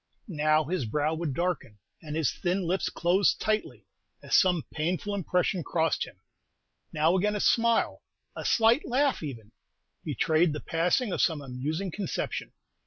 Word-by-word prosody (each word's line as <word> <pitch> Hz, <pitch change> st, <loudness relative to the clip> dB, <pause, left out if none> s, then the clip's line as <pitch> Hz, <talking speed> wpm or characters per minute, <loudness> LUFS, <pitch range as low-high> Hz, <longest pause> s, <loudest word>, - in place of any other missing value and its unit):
Now 155 Hz, -3 st, +2 dB
his 160 Hz, -2 st, -2 dB
brow 150 Hz, +7 st, 0 dB
would 160 Hz, -4 st, -3 dB
darken, 175 Hz, -, -2 dB, 0.2 s
and 150 Hz, -2 st, -6 dB
his 160 Hz, -6 st, +1 dB
thin 185 Hz, +1 st, -1 dB
lips 180 Hz, +3 st, 0 dB
close 180 Hz, +3 st, +2 dB
tightly, 215 Hz, 0 st, -2 dB, 0.4 s
as -, -, +1 dB
some 180 Hz, -5 st, +4 dB
painful 180 Hz, +6 st, -2 dB
impression 180 Hz, -1 st, 0 dB
crossed 160 Hz, -2 st, 0 dB
him; -, -, -15 dB, 0.7 s
now 160 Hz, +4 st, +2 dB
again 210 Hz, +3 st, +1 dB
a -, -, -1 dB
smile, 230 Hz, +2 st, +2 dB, 0.3 s
a -, -, -5 dB
slight 230 Hz, +4 st, +4 dB
laugh 270 Hz, +2 st, +1 dB
even, 115 Hz, -8 st, -7 dB, 0.5 s
betrayed 160 Hz, 0 st, +2 dB
the 150 Hz, -, -4 dB
passing 180 Hz, +8 st, 0 dB
of -, -, 0 dB
some 160 Hz, -4 st, +2 dB
amusing 145 Hz, +8 st, -4 dB
conception. 195 Hz, +1 st, -4 dB
170 Hz, 150 wpm, -28 LUFS, 155-195 Hz, 0.7 s, some